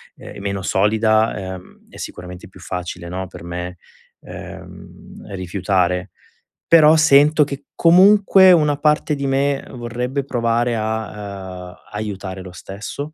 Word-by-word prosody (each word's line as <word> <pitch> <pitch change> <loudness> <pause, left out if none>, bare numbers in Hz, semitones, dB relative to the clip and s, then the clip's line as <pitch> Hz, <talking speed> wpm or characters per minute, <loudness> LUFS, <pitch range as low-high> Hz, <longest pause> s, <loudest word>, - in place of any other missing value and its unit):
è - - -11
meno 100 -1 -3
solida, 110 -1 +1
ehm, 90 - -16
è - - -15
sicuramente 90 +3 -9
più 95 - -17
facile 90 -1 -6
no, 95 +2 -4
per 85 - -12
me, 90 +1 -6 0.4
ehm, - - -12
rifiutare. 90 0 -1 0.6
Però 155 -1 +8
sento 150 0 +5
che 140 0 -7
comunque 190 +2 +6
una 150 -4 +3
parte 150 +1 +1
di 140 -1 -2
me 135 +1 0
vorrebbe 125 +3 -4
provare 120 -2 0
a, 100 -4 -5
uhm, 90 - -14 0.2
aiutare 100 -3 -5
lo 90 -1 -10
stesso. 105 - -8
110 Hz, 130 wpm, -19 LUFS, 95-140 Hz, 0.6 s, Però